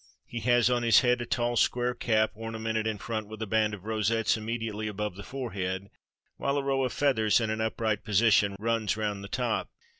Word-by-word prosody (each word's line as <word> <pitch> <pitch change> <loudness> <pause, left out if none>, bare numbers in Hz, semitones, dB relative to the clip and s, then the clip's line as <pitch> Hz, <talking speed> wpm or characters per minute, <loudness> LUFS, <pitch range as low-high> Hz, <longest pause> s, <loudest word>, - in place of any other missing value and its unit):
He 120 - -6
has 120 0 +3
on 125 -1 +2
his 115 +3 +6
head 125 -1 +2
a 120 - -4
tall 120 -1 0
square 125 +1 +2
cap, 110 -2 +1
ornamented 110 0 -3
in 110 -1 -1
front 110 0 -4
with 110 0 -9
a - - -2
band 110 0 +1
of 100 0 -15
rosettes 110 +1 +1
immediately 110 -1 -3
above 105 -2 -3
the 100 - -8
forehead, 100 -6 -4 0.5
while 140 +1 0
a 140 - 0
row 135 -1 +1
of 130 - -1
feathers 115 -7 +2
in 110 -2 -1
an 110 0 -2
upright 110 -2 -1
position 105 -1 +3
runs 110 -1 0
round 105 -2 -2
the - - -6
top. 120 +1 -1
110 Hz, 205 wpm, -28 LUFS, 105-120 Hz, 0.5 s, his